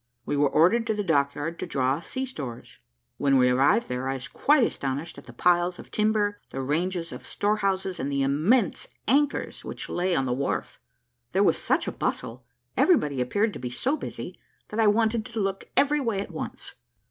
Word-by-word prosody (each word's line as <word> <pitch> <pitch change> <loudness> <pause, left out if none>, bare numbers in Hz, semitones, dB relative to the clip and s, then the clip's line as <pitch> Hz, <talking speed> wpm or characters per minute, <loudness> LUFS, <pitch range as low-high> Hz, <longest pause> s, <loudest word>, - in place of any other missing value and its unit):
We - - -1
were 145 0 +3
ordered 225 +11 +4
to 220 - +1
the 205 - -1
dockyard 145 0 0
to - - -4
draw 135 +1 +1
sea 260 +9 -4
stores. 135 - -8 0.4
When 140 -1 +3
we 125 -1 +4
arrived 140 - +3
there, 125 +1 -3
I 135 - -1
was 130 -2 -6
quite 290 -3 +3
astonished 140 -4 -2
at - - -17
the - - -9
piles 175 0 +2
of - - -12
timber, 210 -1 +1
the 135 - -6
ranges 170 +4 -1
of - - -8
storehouses, 195 -3 -1
and 140 - -2
the 140 -1 +1
immense 165 - +2 0.2
anchors 285 +3 +1
which - - -6
lay 180 0 0
on 135 - +1
the 125 - 0
wharf. 135 +2 -2 0.5
There - - +4
was - - +3
such - - +1
a - - -1
bustle, 120 +1 -4 0.3
everybody 150 - +3
appeared 205 - +1
to - - -7
be 125 - -4
so 255 - 0
busy, - - -7 0.3
that 215 - -4
I 220 - +5
wanted 220 +1 +2
to 230 - -5
look 195 -1 -2
every 295 +1 +4
way 230 -7 -1
at 200 - -5
once. - - -7
175 Hz, 195 wpm, -26 LUFS, 140-215 Hz, 0.5 s, I